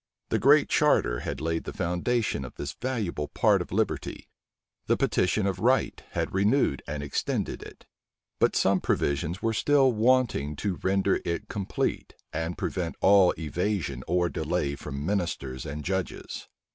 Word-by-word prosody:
The - - +1
Great 145 +3 +5
Charter 105 - +3
had - - -4
laid 80 0 -1
the - - -4
foundation 95 - -1
of 65 - -9
this 70 - -5
valuable 105 - -3
part - - +3
of - - -7
liberty; - - -2 0.6
the - - +3
petition 95 +3 +1
of 95 -2 -1
right 125 +6 +2
had - - -2
renewed 100 - +2
and 70 0 -4
extended 70 - -2
it; - - -12 0.5
but - - +3
some 95 -1 +3
provisions 75 +6 -1
were 115 0 +1
still 135 +2 +4
wanting 115 - +2
to 95 +4 -2
render 95 0 +2
it 85 0 -3
complete, 100 -2 -2 0.2
and 80 +2 -3
prevent 85 -3 -3
all 95 -2 +5
evasion 80 - -2
or 90 +1 +2
delay 80 -3 -1
from 70 +1 -6
ministers 80 -9 -2
and 75 +1 -6
judges. 95 0 -3
90 Hz, 150 wpm, -27 LUFS, 75-105 Hz, 0.6 s, Great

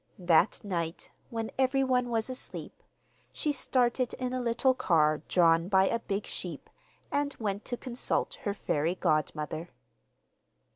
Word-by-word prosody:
That 175 +2 +3
night, 170 -5 -3 0.2
when 225 -1 -3
everyone 260 -2 +2
was 225 -2 0
asleep, 255 0 -6 0.5
she 300 - -1
started 255 -2 +1
in 255 0 -3
a 255 - -1
little 245 +2 +2
car 155 -9 +3
drawn 165 -1 +4
by 190 -1 +4
a 230 - 0
big 200 -2 -3
sheep, - - -6 0.4
and 285 0 0
went 205 -2 -2
to 245 - -3
consult 255 - -2
her 205 -4 -2
fairy 165 -1 0
godmother. 155 +1 -1
220 Hz, 135 wpm, -30 LUFS, 170-255 Hz, 0.5 s, drawn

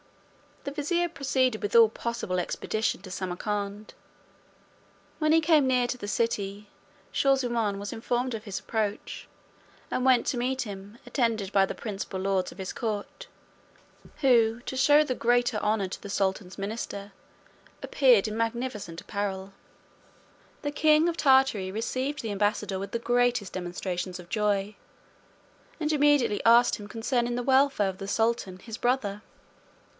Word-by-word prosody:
The 280 - -4
vizier 340 +4 0
proceeded 260 -6 0
with 205 - -3
all 230 -1 +8
possible 225 -5 -3
expedition 220 +4 -2
to 185 - -9
Samarcand. 200 +3 -4 1.3
When 310 -1 +2
he 325 +1 +5
came 310 -3 +4
near 250 -1 +3
the 245 -4 -4
city, 205 -1 -2 0.4
Shaw 275 -1 +3
zummaun 235 -6 -1
was 200 +1 -5
informed 245 +2 -1
of 220 -2 -5
his 200 -2 -4
approach, 215 -2 -3 0.6
and 255 - 0
went 255 -2 +4
to 265 - 0
meet 255 +2 -1
him 200 0 -9
attended 230 -6 -1
by 195 -1 +4
the - - -5
principal 195 -3 -5
lords 190 -1 0
of - - -14
his 190 - -4
court, 225 - -4 0.9
who, 235 -4 +3
to 260 - -6
shew 295 +3 +6
the 280 -4 -2
greater 240 -1 +2
honour 210 -2 0
to 185 - -7
the 200 - -8
sultan's 190 -1 -1
minister, 200 -1 -5 0.7
appeared 245 -7 +4
in 215 +1 -4
magnificent 225 -7 -3
apparel. 195 -2 -4 1.1
The 290 - -1
king 310 +3 +4
of 335 - -4
Tartary 265 -9 +3
received 260 +7 -2
the 225 - -4
ambassador 205 -1 0
with 195 - -6
the 235 - -2
greatest 240 -4 +1
demonstrations 180 0 -4
of 175 -1 -12
joy; 210 -1 0 1.0
and 305 -1 0
immediately 290 -8 +3
asked 235 +1 +6
him 205 - -9
concerning 240 +2 -1
the 245 - -2
welfare 265 -5 +3
of 190 - -8
the 195 - -6
sultan 225 -4 0
his 225 +3 -8
brother. 230 -5 0
225 Hz, 150 wpm, -27 LUFS, 200-255 Hz, 1.3 s, all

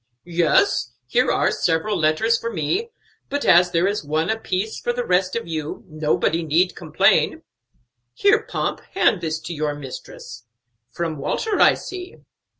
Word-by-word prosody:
"Yes, 175 - +2
here - - +2
are - - +2
several 175 +5 0
letters 165 +8 +2
for 230 0 -3
me; 220 - -1 0.4
but 285 0 -2
as 180 +1 +6
there 170 0 +1
is 205 -1 -1
one 155 +5 0
apiece 220 -1 -2
for 240 - -1
the 245 0 -3
rest 185 +1 +1
of 230 - -3
you, 155 -2 -5
nobody 155 +1 0
need 165 +3 +1
complain. 155 -3 +2 0.7
Here, 415 +2 +4
Pomp, - - -3 0.2
hand 215 - +3
this 160 -1 -2
to 165 +2 -6
your 150 -1 -2
mistress. 125 -3 -10 0.4
From 160 +2 -4
Walter, 405 - -1
I - - +6
see." 370 -1 -8
175 Hz, 150 wpm, -22 LUFS, 155-220 Hz, 0.7 s, as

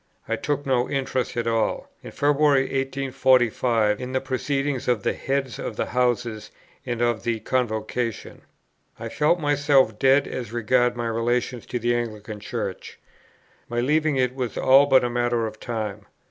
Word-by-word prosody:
I - - 0
took 145 0 -2
no 130 -2 +1
interest 130 -3 -2
at 120 - 0
all, 115 -1 0
in - - -9
February, 145 -1 +3
1845, 130 -5 +1
in 125 +1 -5
the 130 - +2
proceedings 135 +1 -2
of 120 -5 +1
the - - +1
Heads 135 -4 -2
of - - -5
Houses 120 -3 -1 0.4
and 120 -1 -1
of 120 -2 +1
the 115 -1 -1
Convocation. 115 -1 -2 0.6
I - - -5
felt 155 +4 +2
myself 145 -7 +2
dead 135 +1 +4
as 120 -4 -5
regarded 120 +1 +1
my 120 - -2
relations 120 +1 -1
to - - -3
the 120 0 0
Anglican 110 -3 -4
Church. - - -5 0.7
My 120 - -1
leaving 150 +4 +2
it 130 -1 +1
was 125 -3 -4
all 135 +2 +6
but 130 - +5
a - - +1
matter 120 -1 0
of 110 -1 -7
time. 110 -3 -5
125 Hz, 160 wpm, -24 LUFS, 115-135 Hz, 0.7 s, all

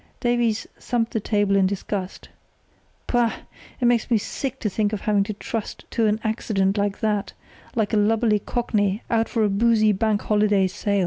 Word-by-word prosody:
Davies 240 -3 +1
thumped 235 -1 -1
the 225 - +1
table 205 -1 +1
in 195 -1 +4
disgust. 195 -1 -4 0.8
"Pah! 240 -2 +1 0.4
It 250 - 0
makes 240 -1 +2
me 235 - +4
sick 265 +5 -4
to 220 - 0
think 210 +1 0
of 210 - -3
having 210 -2 +2
to 215 - -4
trust 215 +1 -5
to 225 -2 +2
an 210 +1 +1
accident 205 -3 0
like 205 0 -1
that, 210 -3 -1 0.4
like 220 -2 0
a - - +4
lubberly 215 +1 +3
cockney 210 -3 0
out 225 -1 +2
for 225 -3 +1
a - - +4
boozy 215 +1 +3
Bank 210 +1 0
Holiday 210 -2 +3
sail. 200 +2 -1
215 Hz, 180 wpm, -23 LUFS, 205-230 Hz, 0.8 s, in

